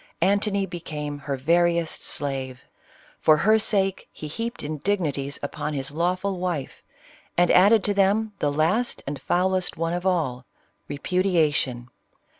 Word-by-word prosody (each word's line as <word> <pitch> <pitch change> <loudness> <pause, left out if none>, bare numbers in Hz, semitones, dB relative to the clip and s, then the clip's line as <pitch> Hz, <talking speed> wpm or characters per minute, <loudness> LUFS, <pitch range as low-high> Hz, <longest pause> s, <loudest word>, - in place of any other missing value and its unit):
Antony 200 0 +2
became 150 -5 -6
her 140 -1 -3
veriest 170 +3 +1
slave; 135 -3 -3 0.6
for 155 -1 +5
her 215 +7 +4
sake 195 -3 0
he 155 - -8
heaped 230 +10 -5
indignities 150 -3 -2
upon 150 +1 -3
his 135 0 -3
lawful 180 +4 -1
wife, 175 -7 -3 0.6
and 175 0 +4
added 200 +3 +6
to 205 - +1
them 205 +2 +2
the 145 - +1
last 170 +12 0
and 140 -1 -5
foulest 185 +1 0
one 165 +1 -1
of 175 0 -3
all, 150 -9 0 0.4
repudiation. 150 -7 0
170 Hz, 130 wpm, -24 LUFS, 145-195 Hz, 0.6 s, added